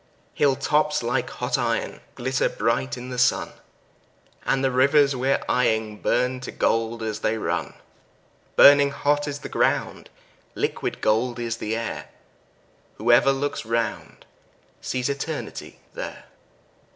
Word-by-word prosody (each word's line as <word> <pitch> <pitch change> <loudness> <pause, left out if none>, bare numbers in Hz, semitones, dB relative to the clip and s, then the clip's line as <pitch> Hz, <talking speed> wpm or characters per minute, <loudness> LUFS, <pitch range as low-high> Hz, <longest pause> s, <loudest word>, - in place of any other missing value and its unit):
Hill 140 -2 +2
tops 150 0 +1
like 120 +1 -1
hot - - -2
iron - - -2
glitter 130 +2 0
bright 65 0 -1
in 125 +1 -8
the 125 - -3
sun, 125 - +2 1.0
And 135 0 +1
the 135 - +2
rivers 140 +2 +4
we're 130 +2 0
eying 110 -4 0
burn 125 +1 +1
to 125 - -7
gold 115 0 0
as 110 -1 -3
they 110 +1 0
run; - - -3 0.8
Burning 140 0 +8
hot 145 +1 0
is 145 -1 -3
the - - -6
ground, - - -1 0.5
liquid - - -2
gold 120 +3 +1
is 115 -1 -3
the 110 0 -3
air; 115 0 -5 0.9
Whoever 120 +4 +4
looks 140 +1 -2
round 115 -1 -3 0.6
sees 125 -1 -2
Eternity 145 +3 -5 0.2
there. - - -7
125 Hz, 130 wpm, -24 LUFS, 115-140 Hz, 1.0 s, Burning